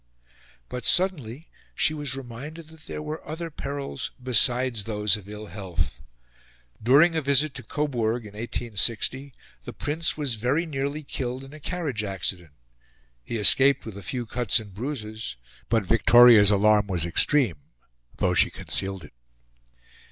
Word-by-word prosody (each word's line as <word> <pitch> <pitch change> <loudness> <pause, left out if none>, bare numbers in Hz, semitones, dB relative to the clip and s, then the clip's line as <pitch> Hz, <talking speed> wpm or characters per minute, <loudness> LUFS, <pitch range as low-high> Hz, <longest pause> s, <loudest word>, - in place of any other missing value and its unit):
But 125 - -6
suddenly 160 - +1 0.3
she 155 - +2
was 145 -4 -3
reminded 135 +6 -9
that 160 0 -16
there 150 - -6
were 155 +1 -6
other 165 +2 -6
perils 140 -1 -5
besides 125 -2 +2
those 105 -3 +1
of 105 -2 -9
ill 105 0 -8
health. 90 -7 -5 0.8
During 145 +9 +5
a 160 - +1
visit 140 +1 +2
to - - -7
Coburg 120 -6 -2
in 105 - -11
1860, 120 +4 -2 0.3
the - - -8
Prince 155 +3 -1
was 145 -5 -1
very 140 +8 +1
nearly 145 0 -3
killed 130 -2 -4
in 135 +2 -12
a 155 - -11
carriage 145 -8 -3
accident. 95 -4 -4 0.7
He 115 - -4
escaped 135 +6 +5
with 110 -4 -8
a 100 - -8
few 120 +4 -4
cuts 120 -1 +1
and 105 -3 -11
bruises; 110 - -5 0.3
but 110 -3 +1
Victoria's 115 0 +7
alarm 105 0 +3
was 90 -4 -1
extreme, 100 - +2 0.6
though - - +1
she - - +5
concealed 95 -2 -3
it. 75 - -14
125 Hz, 145 wpm, -25 LUFS, 105-145 Hz, 0.8 s, Victoria's